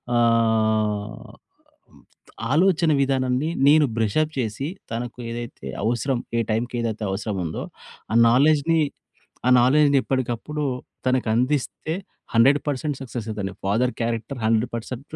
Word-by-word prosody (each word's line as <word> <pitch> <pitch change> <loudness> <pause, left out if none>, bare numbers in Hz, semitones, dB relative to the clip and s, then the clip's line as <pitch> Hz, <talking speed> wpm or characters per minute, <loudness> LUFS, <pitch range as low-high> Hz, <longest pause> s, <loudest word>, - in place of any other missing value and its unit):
ఆహ్, 110 -2 +1 1.2
ఆలోచన 170 0 +3
విధానాన్ని 130 +2 0 0.2
నేను 150 0 +6
బ్రష‌ప్ 150 +9 +1
చేసి, 115 +6 -3 0.2
తనకు 120 +1 -5
ఏదైతే 120 0 -7 0.2
అవసరం, 120 +3 0 0.2
ఏ - - +3
టైమ్‌కి 120 +3 -1
ఏదైతే 110 -1 -3
అవసరముందో, 95 -5 -3 0.5
ఆ - - 0
నాలెడ్జ్‌ని, 150 +5 +4 0.7
ఆ - - +5
నాలెడ్జ్‌ని 140 +2 +4
ఎప్పటికప్పుడు 130 +4 -2 0.4
తనకందిస్తే, 130 +5 0 0.4
100% 140 +3 +2
సక్సెస్ 120 -3 -6
అయితాడండి. 100 -3 -4
Father 125 +5 +1
character 115 +3 -3
100% 115 +5 -2
120 Hz, 100 wpm, -23 LUFS, 110-145 Hz, 1.2 s, నేను